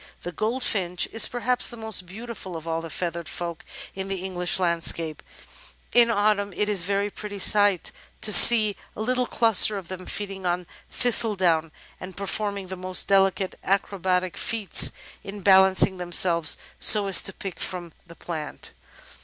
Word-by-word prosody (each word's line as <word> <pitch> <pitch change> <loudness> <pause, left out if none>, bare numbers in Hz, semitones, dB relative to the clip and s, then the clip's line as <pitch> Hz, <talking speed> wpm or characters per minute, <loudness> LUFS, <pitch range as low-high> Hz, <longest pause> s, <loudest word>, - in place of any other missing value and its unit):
The 175 - -6
Goldfinch 200 -3 -2
is 225 - +5
perhaps 245 +1 -1
the 240 - -7
most 220 -5 -4
beautiful 205 -3 -9
of 160 +1 -12
all 165 0 -3
the 165 - -9
feathered 170 0 -5
folk 170 -2 -7 0.3
in 190 0 -7
the 195 - -4
English 180 -2 -1
landscape. 165 -2 -1 0.7
In 240 -1 +4
Autumn 205 -2 0
it 210 - -2
is 205 -4 0
a - - -5
very 200 +1 -2
pretty 205 0 -9
sight 205 -2 +2 0.3
to 215 - +4
see 215 -3 +8 0.2
a - - -7
little 250 +2 -1
cluster 220 -2 +3
of 190 -3 -10
them 185 -1 -9
feeding 195 -2 -6
on 180 0 -2 0.2
thistledown, 185 -10 +2 0.3
and 185 -1 -11
performing 200 -1 -4
the 190 - -6
most 185 0 0
delicate 195 -1 0
acrobatic 185 -2 -2
feats 220 -4 +3 0.3
in 200 +1 -10
balancing 190 -1 +3
themselves 175 -2 +2 0.2
so 210 -2 +6
as 195 -1 +5
to 195 - -1
pick 195 -1 -9
it - - -12
from 175 -3 -5
the 170 - -15
plant. 160 -4 -8
190 Hz, 160 wpm, -23 LUFS, 180-210 Hz, 0.7 s, see